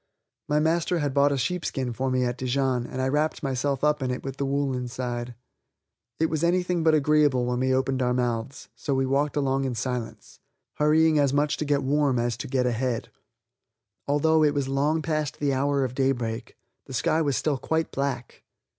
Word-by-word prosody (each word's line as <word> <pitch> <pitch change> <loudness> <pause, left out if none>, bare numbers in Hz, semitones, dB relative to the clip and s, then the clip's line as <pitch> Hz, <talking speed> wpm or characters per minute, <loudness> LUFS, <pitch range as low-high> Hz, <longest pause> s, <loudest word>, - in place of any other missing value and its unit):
My 150 0 +3
master 165 +3 +1
had 145 -4 -1
bought 140 +1 +4
a 140 - 0
sheepskin 135 -3 -2
for 130 +3 -2
me 130 0 +1
at 120 -1 -1
Dijon, 130 -1 0
and 130 - -6
I 130 - +1
wrapped 150 +3 0
myself 135 0 -1
up 150 -1 +2
in 130 - -1
it 125 - -3
with 135 -1 -6
the 140 - -1
wool 140 0 0
inside. 125 -1 -4 0.8
It 160 - +3
was 155 0 -1
anything 180 0 +1
but 160 -1 +4
agreeable 145 -4 +3
when 125 0 -1
we 130 0 +1
opened 130 0 +1
our 125 -1 +1
mouths, 120 0 -2
so 135 +3 -2
we 135 0 +1
walked 140 +2 0
along 135 -1 +1
in 130 -2 -2
silence, 125 -1 -5 0.4
hurrying 155 +1 +4
as 140 -2 +2
much 145 0 +2
to 155 - -2
get 140 -1 +1
warm 140 -1 +2
as 120 0 0
to - - -6
get 130 -1 0
ahead. 125 -1 -1 1.0
Although 155 +2 +3
it 150 -1 +3
was 140 -2 0
long 145 +4 0
past 155 -2 -2
the 145 -2 +1
hour 140 +1 +1
of 125 -2 -3
daybreak, 125 -4 -2 0.3
the 135 - -9
sky 155 +6 +1
was 140 -5 +1
still 145 -4 0
quite 160 +4 -1
black. 135 -3 -3
135 Hz, 200 wpm, -26 LUFS, 125-150 Hz, 1.0 s, bought